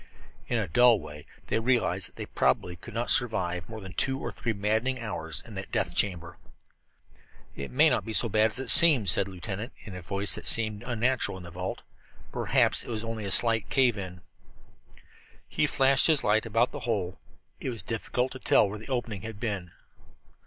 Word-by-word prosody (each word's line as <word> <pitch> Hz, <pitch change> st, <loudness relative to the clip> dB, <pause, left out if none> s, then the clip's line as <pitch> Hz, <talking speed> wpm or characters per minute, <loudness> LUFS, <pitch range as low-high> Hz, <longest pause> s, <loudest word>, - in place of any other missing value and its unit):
In 120 Hz, -, 0 dB
a 110 Hz, -4 st, -1 dB
dull 120 Hz, +5 st, +5 dB
way 75 Hz, -2 st, -11 dB, 0.2 s
they -, -, 0 dB
realized 120 Hz, +1 st, +1 dB
that -, -, -28 dB
they -, -, -6 dB
probably 90 Hz, -, 0 dB
could 110 Hz, +6 st, -12 dB
not 120 Hz, +1 st, -1 dB
survive 90 Hz, -8 st, +1 dB
more 110 Hz, -1 st, -7 dB
than 95 Hz, -2 st, -9 dB
two 135 Hz, +4 st, -1 dB
or -, -, -4 dB
three 115 Hz, -, -3 dB
maddening 110 Hz, +5 st, -1 dB
hours 80 Hz, -8 st, -4 dB
in 115 Hz, -, -12 dB
that 95 Hz, -1 st, -7 dB
death -, -, -1 dB
chamber. 85 Hz, -4 st, -1 dB, 1.2 s
"It 70 Hz, -, -6 dB
may 150 Hz, +5 st, +5 dB
not -, -, +2 dB
be 115 Hz, -, -6 dB
so 115 Hz, -, +4 dB
bad 110 Hz, +1 st, +3 dB
as 110 Hz, -, -3 dB
it 130 Hz, -2 st, +3 dB
seems," 135 Hz, -, +7 dB
said 95 Hz, -, +1 dB
Lieutenant 95 Hz, +5 st, -6 dB
Mackinson 100 Hz, -, -12 dB
in 90 Hz, -, -6 dB
a -, -, -10 dB
voice 100 Hz, +4 st, -1 dB
that -, -, -5 dB
seemed 110 Hz, -3 st, +1 dB
unnatural 125 Hz, -3 st, -1 dB
in 95 Hz, -, -10 dB
that 85 Hz, -, -10 dB
vault. 90 Hz, +2 st, -5 dB, 0.5 s
"Perhaps -, -, +1 dB
it -, -, -11 dB
was 110 Hz, -2 st, -3 dB
only 115 Hz, -2 st, -5 dB
a 100 Hz, -, -3 dB
slight 115 Hz, -1 st, +2 dB
cave 130 Hz, -4 st, +3 dB
in." 90 Hz, -3 st, -7 dB, 1.3 s
He -, -, 0 dB
flashed 135 Hz, 0 st, +3 dB
his 155 Hz, -4 st, +3 dB
light 110 Hz, +2 st, +2 dB
about 115 Hz, +3 st, +1 dB
the -, -, -6 dB
hole. 95 Hz, -4 st, -2 dB, 0.4 s
It -, -, -4 dB
was 115 Hz, -3 st, -5 dB
difficult 125 Hz, +2 st, -2 dB
to 130 Hz, -, -8 dB
tell 105 Hz, -, +4 dB
where 105 Hz, +2 st, -6 dB
the 110 Hz, -, -12 dB
opening 120 Hz, -6 st, -3 dB
had 110 Hz, -2 st, -8 dB
been. 100 Hz, -6 st, -3 dB
110 Hz, 200 wpm, -28 LUFS, 95-120 Hz, 1.3 s, seems